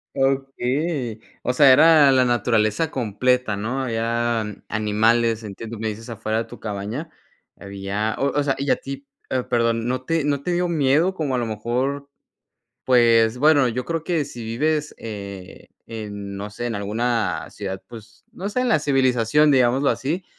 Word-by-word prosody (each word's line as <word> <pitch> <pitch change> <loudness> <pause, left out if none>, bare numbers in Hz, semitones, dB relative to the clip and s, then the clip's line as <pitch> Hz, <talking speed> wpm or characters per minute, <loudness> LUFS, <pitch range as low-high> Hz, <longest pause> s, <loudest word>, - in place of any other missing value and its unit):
Okey. 135 -1 -1 0.2
O 125 - 0
sea, 135 0 +7
era 150 0 +7
la 130 -1 +4
naturaleza 120 +3 +1
completa, 125 0 0
¿no? 120 +7 -3
Habían 115 -2 -2
animales, 110 +2 +1
entiendo, 110 +2 -7
me 110 0 -2
dices 115 +3 -8
afuera 110 -1 -2
de 115 - -3
tu - - -12
cabaña, 110 +9 -5 0.5
había, 100 +2 -3
o 140 - +2
o - - +2
sea, 135 -1 0
y 140 +1 -3
a - - +4
ti 140 0 -8 0.2
eh, 130 -1 0
perdón, 115 -1 0
¿no 130 +1 -2
te 165 0 0
no 145 -1 0
te 175 +4 -2
dio 180 +1 +1
miedo 155 +3 +2
como 150 -7 -2
a - - 0
lo 120 - -1
mejor 125 +6 -2 0.8
Pues 115 -2 +4
bueno, 145 -2 +4
yo 125 +2 -3
creo 165 -1 -2
que 165 -3 0
si 120 -4 -9
vives, 150 +7 -1
eh, 100 -4 -8 0.2
en 100 -3 -7
no 100 +1 -5
sé, 120 +4 -5
en 120 - -3
alguna 110 +3 -1
ciudad, 95 -2 -6
pues 110 -2 -13
no 195 - -5
sé, 230 +5 -1
en 250 - 0
la 225 - +4
civilización, 135 0 +3
digámoslo 130 +2 +3
así, 165 +7 -2
120 Hz, 170 wpm, -22 LUFS, 110-140 Hz, 0.8 s, sea